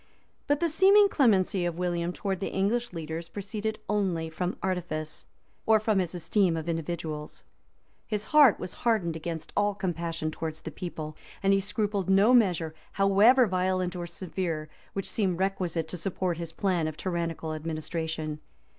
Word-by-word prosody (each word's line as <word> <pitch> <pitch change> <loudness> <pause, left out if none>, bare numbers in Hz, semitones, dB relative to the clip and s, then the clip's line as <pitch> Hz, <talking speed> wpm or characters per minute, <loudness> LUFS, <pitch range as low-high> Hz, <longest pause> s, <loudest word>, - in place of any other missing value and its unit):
} - - -41
But 290 +1 +2
the 340 - +3
seeming 390 +5 +6
clemency 200 - +3
of 175 -1 -2
William 175 -1 -1
toward 190 0 -3
the 195 - -3
English 225 +5 0
leaders, 165 0 -5
proceeded 210 +3 -4
only 180 -6 0
from 180 +3 -2
artifice, 175 -5 -3 0.4
or 220 0 +6
from 215 -2 +1
his 180 -1 -2
esteem 175 0 +1
of 160 0 -5
individuals: 160 -2 -4 0.6
his 210 -1 -2
heart, 290 -7 +7
was 180 - -6
hardened 215 -9 +1
against 165 0 -5
all 205 0 +2
compassion 170 -4 -2
towards 160 0 -5
the 160 - -6
people, 155 -3 -6 0.3
and 195 0 +4
he 195 - +4
scrupled 205 -1 -1
no 200 +5 +5
measure, 175 -9 +3 0.2
however 205 +6 +5
violent 185 -2 0
or 175 -1 -4
severe, 170 -4 -4 0.2
which 195 -1 -3
seemed 190 -5 0
requisite 185 -4 -1
to 180 - -4
support 180 -1 -2
his 165 -1 -5
plan 175 -2 0
of 155 -1 -5
tyrannical 170 -3 -2
administration. 155 0 -3
180 Hz, 160 wpm, -28 LUFS, 165-205 Hz, 0.6 s, heart